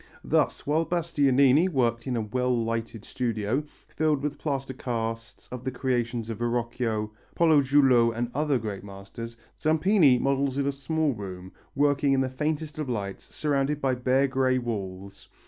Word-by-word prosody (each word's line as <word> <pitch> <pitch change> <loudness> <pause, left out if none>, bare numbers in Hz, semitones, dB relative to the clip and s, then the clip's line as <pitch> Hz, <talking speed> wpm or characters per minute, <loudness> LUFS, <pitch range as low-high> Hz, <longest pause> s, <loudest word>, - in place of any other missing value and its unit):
Thus - - +1
while 155 +3 +2
Bastianini 145 -2 +3
worked 120 -5 0
in 125 - -1
a 115 - 0
well 125 +1 0
lighted 115 -1 -4
studio, 115 +2 -1 0.2
filled 150 -3 0
with 150 0 -3
plaster 135 -3 -3
casts 115 -2 -4
of 125 -1 -6
the 130 - -1
creations 120 -3 -1
of 115 - -6
Verrocchio, 120 -2 -1 0.2
Pollajuolo 140 -6 +5
and 120 +1 -3
other 150 -1 +1
great 105 -4 -5
masters, 100 +4 -9 0.2
Zampini 160 -3 +4
models 135 0 0
in 140 - +1
a 140 - +1
small 145 +2 -1
room, 95 -3 -8 0.2
working 145 0 +2
in 135 - +3
the 130 - 0
faintest 150 +3 -3
of 150 -4 -3
lights, 100 -5 -4
surrounded 145 -1 -1
by 135 -2 +1
bare 130 +2 +2
grey 130 -1 +1
walls. 100 -5 -5
130 Hz, 155 wpm, -27 LUFS, 115-145 Hz, 0.2 s, Pollajuolo